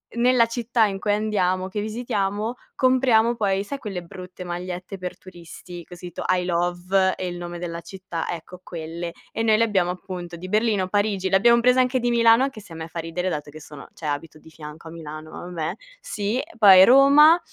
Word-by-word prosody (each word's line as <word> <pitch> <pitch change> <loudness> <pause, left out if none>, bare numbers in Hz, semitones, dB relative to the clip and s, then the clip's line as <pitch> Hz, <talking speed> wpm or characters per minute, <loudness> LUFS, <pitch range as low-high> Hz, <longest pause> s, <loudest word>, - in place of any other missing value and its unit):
nella 240 0 +4
città 230 0 +1
in 195 -2 -2
cui 205 +1 0
andiamo, 190 -3 0
che 205 +2 -4
visitiamo, 215 0 -2 0.2
compriamo 250 -3 +3
poi, 195 -3 0
sai, 275 +7 -5
quelle 200 -8 -6
brutte 180 +1 -10
magliette 180 +2 -6
per 180 -1 -6
turisti 175 -1 -11
con 180 - -12
scritto: 175 -1 -7
"I 180 -1 0
love 180 +2 +1
e 185 - -4
il 175 0 -5
nome 175 0 -7
della 170 -1 -5
città" 185 -3 -6
ecco 175 +1 -7
quelle. 170 0 -6 0.2
E 225 - -2
noi 220 -1 +4
le 230 - +3
abbiamo, 190 -5 +1
appunto, 180 -1 -7
di 180 +2 -8
Berlino, 210 -2 +1
Parigi, 205 -2 0
le 190 - +2
abbiam 235 +4 +4
prese 250 +1 +4
anche 255 0 +2
di 245 0 0
Milano, 230 0 +5
anche 270 -5 -3
se 195 -5 -14
a - - -8
me 160 0 -6
fa 165 - -10
ridere 165 +3 -3
dato 150 -3 -5
che 155 +1 -11
sono 150 -1 -11
cioè 160 - -7
abito 155 +2 -4
di 160 - -17
fianco 155 +1 -11
a - - -9
Milano, 155 -1 -9
ma - - -9
vabbè, 170 -3 -4 0.3
sì. 225 - -2 0.2
Poi 195 -4 +9
Roma, 285 - +7
185 Hz, 205 wpm, -23 LUFS, 175-225 Hz, 0.3 s, Poi